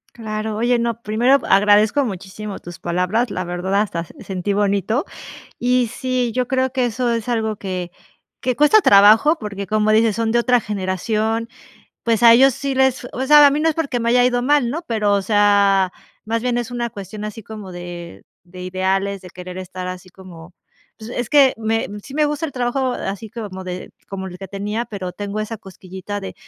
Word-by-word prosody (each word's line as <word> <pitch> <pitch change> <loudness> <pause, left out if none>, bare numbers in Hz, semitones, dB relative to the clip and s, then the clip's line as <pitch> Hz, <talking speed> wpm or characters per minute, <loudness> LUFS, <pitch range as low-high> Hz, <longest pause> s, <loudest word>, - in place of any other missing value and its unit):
Claro. 215 -1 -4
Oye, 240 +2 +2
no, 235 0 -2
primero 235 +5 +3
agradezco 210 +6 +4
muchísimo 200 -1 -6
tus 175 0 -10
palabras, 180 +8 0
la 185 - -3
verdad 180 +3 -1
hasta 170 -5 -2
se - - -14
sentí 190 +1 -3
bonito. 205 - 0 0.5
Y 250 0 +2
sí, 250 -1 -1
yo 250 0 0
creo 260 -1 0
que 255 -1 0
eso 240 +1 -1
es 230 -1 -2
algo 220 -2 0
que 185 -3 -5 0.5
que 255 -1 0
cuesta 300 - +5
trabajo, 220 - +6
porque 200 -2 -6
como 215 +2 +2
dices, 220 -1 +3
son 225 0 0
de 240 - +3
otra 245 +1 +3
generación, 215 +3 -2 0.6
pues 230 0 +1
a 230 - +9
ellos 265 +2 +6
sí 275 +1 -3
les, 265 -1 +1
o - - -6
sea, 295 +1 +8
a - - +6
mí 290 +2 0
no 325 - +2
es 315 - +1
porque 280 -7 -2
me 230 - -1
haya 245 +1 +4
ido 245 -1 +2
mal, 265 -1 +2
¿no? 310 +6 -3
Pero, 210 -3 +1
o 200 - +3
sea, 200 -2 +3 0.3
más 230 +1 -1
bien 245 0 -1
es 240 -1 -3
una 240 -1 -2
cuestión 210 +1 -8
así 215 +1 -7
como 210 -2 -9
de 175 -1 -9 0.2
de 180 +1 -11
ideales, 190 +2 -1
de 180 - -10
querer 180 +1 -9
estar 185 0 -6
así 185 0 -8
como, 180 -2 -13 0.4
pues 220 +2 -9
es 245 -2 -3
que 275 -1 +5
me 225 0 -1
sí 270 - -11
me 300 0 +2
gusta 295 +2 -2
el 290 - -8
trabajo 250 +1 -1
así 200 -1 -5
como 205 -4 -7
de 180 0 -6 0.2
como 190 -1 -5
el 180 -1 -9
que 195 -1 -8
tenía, 205 +4 -3
pero 185 -4 -6
tengo 205 +2 -4
esa 215 +1 -5
cosquillita 190 0 -8
de 195 - -7
215 Hz, 200 wpm, -20 LUFS, 195-245 Hz, 0.6 s, a